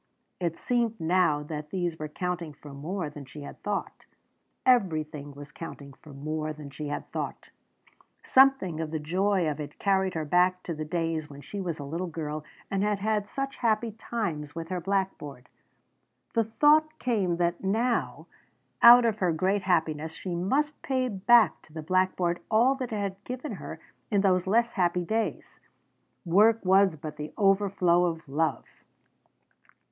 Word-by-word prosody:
It 170 -2 -2
seemed 235 -3 0
now 160 -3 +2
that 150 0 -6
these 175 -3 -2
were 155 - -3
counting 175 0 -4
for 145 0 -12
more 160 +5 -4
than 145 -1 -9
she 145 +2 -10
had - - -10
thought. 205 -1 -4 0.6
Everything 155 - +1
was 145 +1 -10
counting 140 -4 -9
for 150 +2 -15
more 155 +2 -4
than 150 -2 -10
she 150 +1 -6
had 145 - -5
thought! - - -5 0.7
Something 265 -12 +4
of 160 -1 -3
the 160 - -2
joy 185 +3 +1
of 150 0 -2
it 150 -1 -7
carried 190 -2 +1
her 160 -1 -2
back 180 +3 +2
to 170 - -4
the 155 0 -5
days 165 -1 -2
when 140 0 -11
she 200 +6 -6
was 170 -4 -3
a 145 - -6
little 165 +6 -4
girl 155 -2 -5 0.3
and 195 -1 0
had 210 0 +1
had 210 0 -1
such 275 +4 -4
happy 225 -1 +1
times 185 -10 -4
with 165 0 -6
her 180 -1 -2
blackboard. 185 -9 -3 0.8
The 230 -1 +2
thought 305 +7 +3
came 200 - 0
that 175 +1 0
now, 230 +5 0 0.6
out 240 +1 +10
of 220 -2 0
her 180 -2 +2
great 190 +5 +1
happiness, 160 -4 0
she 180 +2 -5
must 275 - 0
pay 260 -2 0
back 225 +3 +4
to 155 - -21
the 160 -1 -6
blackboard 185 0 +1
all 235 +5 +4
that 260 -3 -5
it - - -2
had 200 -1 -4
given 255 +4 -5
her 175 -5 -7 0.3
in 205 -3 +2
those 185 -2 +2
less 235 +4 +3
happy 175 -1 +1
days. 220 +4 -3 0.7
Work 210 +5 +4
was 190 -1 +5
but 155 0 -8
the 150 +1 -6
overflow 195 -3 +3
of 165 -2 -3
love! 155 +4 -1
180 Hz, 170 wpm, -28 LUFS, 155-210 Hz, 0.8 s, out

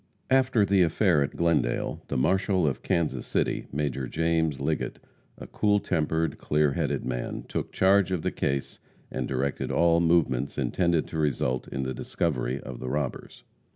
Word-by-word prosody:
After 130 -5 +4
the 100 -1 +3
affair 85 -1 +3
at 70 - -2
Glendale, 85 -1 0
the - - -2
marshal 95 +5 +2
of 70 - -1
Kansas 75 -7 -1
City, - - -1
Major 70 -3 -2
James 80 -1 0
Liggett, - - -2 0.4
a - - -9
cool 105 -1 +1
tempered, 80 -3 -1
clear 75 -1 +2
headed - - -1
man, - - -4
took - - -3
charge 95 0 +3
of 90 -4 -1
the - - 0
case 70 0 -2 0.3
and 65 - -3
directed 70 +1 -2
all 85 0 +4
movements 80 -6 +1
intended 85 -3 +1
to 80 - -4
result 65 -4 0
in 65 -1 -3
the 65 0 -3
discovery 65 -5 -2
of 65 -2 -8
the 65 - -4
robbers. 70 -1 -4
80 Hz, 160 wpm, -27 LUFS, 70-85 Hz, 0.4 s, After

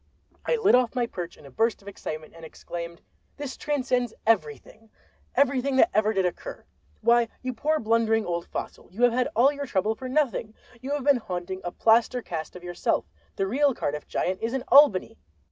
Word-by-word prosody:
I - - +3
lit 440 -3 +3
off 250 0 +3
my 245 -1 +1
perch 175 -7 -7
in - - -16
a 140 - -12
burst 225 - 0
of - - -18
excitement, 155 -5 -7
and 165 - -13
exclaimed: 170 +1 -8 0.3
"This 285 -2 -5
transcends 255 -5 -1
everything! 215 - -1 0.5
everything 275 0 +2
that 335 +7 +4
ever 215 0 +3
did 195 -3 +1
occur! - - -5 0.4
Why 235 +1 +4 0.2
you 255 0 -2
poor 310 +6 0
blundering 225 0 +2
old 170 -1 -3
fossil, - - -7
you 220 +7 -3
have 245 -1 +5
had 250 +1 +1
all 255 +5 +5
your 285 -1 -5
trouble 210 0 +1
for 255 +3 -7
nothing—you 250 -2 -2
have 290 -1 -1
been 285 -1 +5
haunting 185 -3 -5
a 175 - -4
plaster 230 +4 +3
cast 160 -1 -6
of 180 - -10
yourself—the 85 - -3
real 270 +6 +2
Cardiff 150 -6 -3
Giant 185 +1 -2
is 230 +2 -2
in 265 - -2
Albany! 280 -10 +5
225 Hz, 185 wpm, -26 LUFS, 180-260 Hz, 0.5 s, have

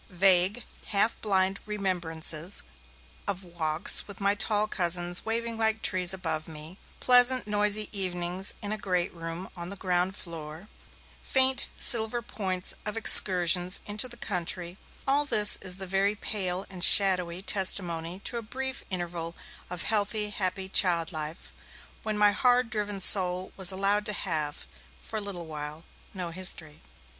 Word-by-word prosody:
Vague, 190 +4 +2 0.2
half 210 +2 0
blind 195 -2 0
remembrances 175 -4 -3 0.6
of 195 -1 -3
walks, 170 -1 +1
with 200 -2 -10
my 200 0 +1
tall 210 0 +1
cousins 175 -2 0
waving 230 0 -4
like 220 0 0
trees 180 -2 +1
above 165 -5 -3
me, 160 +3 -9 0.2
pleasant 250 0 +4
noisy 210 0 +1
evenings 185 -1 -3
in 205 - -5
a 215 - -5
great 180 -3 -3
room 165 +2 -7
on 170 -1 -7
the 200 - -8
ground 185 0 -1
floor, 165 +1 -9 0.5
faint 265 0 +3
silver 225 0 +3
points 185 -5 -4
of 210 +1 -6
excursions 180 -3 +5
into 210 +4 +1
the 240 -1 -13
country, 180 -3 -2 0.3
all 280 +2 +2
this 210 -7 +3
is 185 -1 -3
the 190 - -5
very 195 +2 -1
pale 190 -3 -2
and 185 -2 -7
shadowy 185 -3 +5
testimony 180 -4 +2
to 240 - -2
a - - -5
brief 265 +4 -7
interval 175 -2 -6 0.3
of 180 -1 -4
healthy, 210 0 0
happy 190 -1 -2
child 175 -3 +2
life, 155 0 -7 0.5
when 215 -1 -4
my 210 0 +3
hard 245 +1 +1
driven 210 -3 -4
soul 185 -1 +6
was 190 -2 +5
allowed 200 +2 0
to 210 - -4
have, 155 -7 -2 0.3
for 220 - -8
a - - -4
little 195 -4 -8
while, 150 0 -9 0.3
no 180 -3 -7
history. 165 -4 -3
190 Hz, 150 wpm, -26 LUFS, 175-210 Hz, 0.6 s, soul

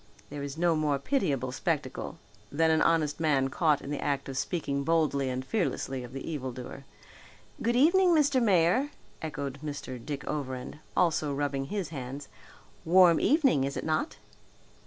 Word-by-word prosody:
There 145 -1 -5
is 140 +1 -5
no 170 -1 +2
more 150 -2 +1
pitiable 140 - -1
spectacle 130 - -3 0.3
than 160 +2 +3
an 160 - +3
honest 155 -3 +2
man 140 -4 +2
caught 150 +1 +1
in 140 - -6
the 145 - -3
act 140 -1 -1
of 135 - -6
speaking 140 -1 -2
boldly 150 -4 +1
and 130 +1 -3
fearlessly 135 - -2
of 120 - -9
the 135 +1 -7
evil 135 -5 -3
doer. 130 +2 -9 0.8
"Good 235 +1 +1
evening, 350 +8 +5
Mr. 285 -4 +3
Mayor," 200 - +3 0.3
echoed 140 -3 -5
Mr. 135 -5 -6
Dick 145 -2 -5
Overend, 135 -1 -4 0.2
also 160 -4 +2
rubbing 140 -1 -1
his 195 +1 -3
hands; 140 -1 -7 0.5
"warm 175 -1 +6
evening, 275 - +3
is 140 0 -2
it - - -4
not?" 155 0 -1
150 Hz, 160 wpm, -29 LUFS, 135-170 Hz, 0.8 s, warm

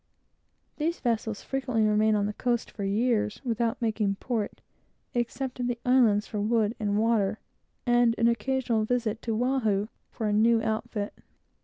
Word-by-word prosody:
These 330 +3 -1
vessels 225 -3 -1
frequently 255 -5 0
remain 215 0 +3
on 205 -1 +1
the 210 - -2
coast 240 +1 -1
for 200 - -6
years, 210 +1 +1
without 230 -1 0
making 215 -3 0
port, 220 0 -3 0.5
except 250 +2 -2
at 245 - 0
the 245 -1 -1
islands 235 -5 +4
for 210 - -4
wood 220 0 +2
and 205 -2 0
water, 215 -2 +2 0.5
and 240 -1 +4
an 230 - +3
occasional 235 -1 +1
visit 230 -1 -1
to 225 -2 -2
Oahu 220 -6 +1 0.2
for 225 - -5
a 210 - +1
new 225 +2 +4
outfit. 220 -1 -2
225 Hz, 155 wpm, -27 LUFS, 210-240 Hz, 0.5 s, islands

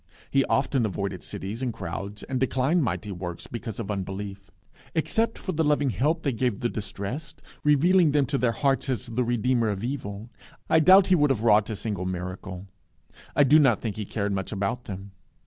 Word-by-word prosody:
He 135 0 +4
often 135 -2 +1
avoided 100 -3 -3
cities 105 +6 -6
and 130 -2 -1
crowds, 100 +2 -6
and 130 -2 -2
declined 135 +6 +2
mighty 100 -2 -2
works 90 -2 -6
because 115 -2 -6
of 105 -3 -3
unbelief. 100 0 -5 0.5
Except 225 +8 0
for 185 - -4
the 160 -2 0
loving 145 -3 +2
help 150 - 0
they 140 - +1
gave 120 -3 -1
the 120 - +1
distressed, 110 +8 -6 0.2
revealing 160 +3 +4
him 145 -1 +3
to 140 0 -1
their 125 -2 +2
hearts 135 +2 0
as 125 -6 -1
the 120 +2 -1
Redeemer 120 -2 +1
from 100 +4 -5
evil, 115 -4 -5 0.4
I 160 - +5
doubt 185 +4 +7
if - - -4
he 185 - +6
would 150 -3 +3
have 120 -5 0
wrought 105 -2 +4
a 110 - -2
single 100 -2 -3
miracle. 90 +1 -5 0.7
I 145 - +6
do 145 +3 +6
not 130 -8 +4
think 110 -4 -4
he 105 - -4
cared 100 0 -2
much 95 -1 -3
about 105 +4 -2
them. 95 0 -7
115 Hz, 200 wpm, -26 LUFS, 100-140 Hz, 0.7 s, doubt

